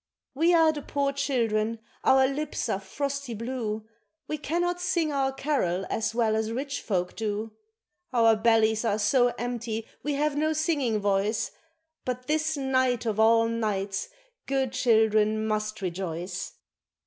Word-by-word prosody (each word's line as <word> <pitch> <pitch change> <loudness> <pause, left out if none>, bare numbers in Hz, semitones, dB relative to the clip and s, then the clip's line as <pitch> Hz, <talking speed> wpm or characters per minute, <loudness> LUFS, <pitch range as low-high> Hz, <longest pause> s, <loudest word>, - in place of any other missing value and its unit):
We 325 +6 +3
are 325 -1 +6
the 300 -1 -5
poor 280 0 -1
children, 230 -5 0 0.3
our 265 0 +5
lips 275 0 -2
are 195 - 0
frosty 275 +5 -4
blue, 225 -2 -3 0.4
We 305 - -3
cannot 350 +4 -1
sing 345 -4 +1
our 270 -1 +1
carol 260 - -1
as 225 0 -1
well 225 -2 +2
as 220 0 -1
rich 275 +4 -3
folk 180 -4 -1
do, 215 0 -3 0.6
Our 230 -3 +5
bellies 220 0 +3
are 215 -3 +1
so 245 +4 +3
empty 235 -2 -3 0.2
we 295 - -1
have 295 +1 0
no 310 +2 +1
singing 295 -8 +1
voice, 205 +2 0 0.5
But 250 0 -4
this 310 +2 0
night 260 -3 +1
of 220 -2 -1
all 225 +1 +5
nights 205 - -2 0.4
good 270 -2 0
children 220 -3 +3
must 215 -1 -2
rejoice. 180 0 -4
235 Hz, 145 wpm, -27 LUFS, 215-280 Hz, 0.6 s, are